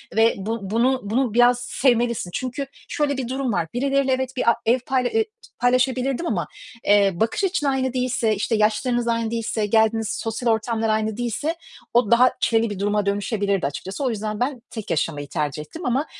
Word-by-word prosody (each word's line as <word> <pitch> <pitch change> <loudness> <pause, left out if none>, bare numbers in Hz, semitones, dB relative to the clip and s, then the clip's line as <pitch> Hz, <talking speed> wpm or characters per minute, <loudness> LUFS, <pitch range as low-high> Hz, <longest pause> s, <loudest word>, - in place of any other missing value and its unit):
ve 225 +1 +5
bu 220 +4 -3
bunu, 255 +3 +2
bunu 230 +2 0
biraz 245 +1 +5
sevmelisin. 240 -6 +1
Çünkü 255 +2 -3 0.2
şöyle 285 -2 0
bir 255 -3 -3
durum 260 -3 -2
var. 170 -3 0
Birileriyle 275 +1 +1
evet 260 0 -1
bir, 235 - +3
a - - +4
ev 240 +3 +3
payla 255 -2 +1
ııı, 450 - +4 0.4
paylaşabilirdim 255 +4 +1
ama, 175 -7 -1 0.4
eee, 200 -1 +5
bakış 225 - -1
açın 370 -6 0
aynı 260 -2 0
değilse, 250 -4 +1
işte, 215 +3 0
yaşlarınız 235 +3 +1
aynı 230 -1 0
değilse, 225 -2 -1
geldiğiniz 220 +1 +2
sosyal 225 +2 -2
ortamlar 225 0 0
aynı 215 0 0
değilse, 245 +7 -2 0.4
o 235 -3 +3
daha 250 +2 +6
çileli 230 -2 +2
bir 205 -2 -5
duruma 205 0 0
dönüşebilirdi 200 - 0
açıkçası. 190 - -5
O 260 - +1
yüzden 215 -1 -3
ben, 250 0 -1
tek 220 -3 -7
yaşamayı 145 -3 -1
tercih 150 -1 -2
ettim 320 - -9
ama, 260 +4 +1
235 Hz, 180 wpm, -23 LUFS, 215-255 Hz, 0.4 s, daha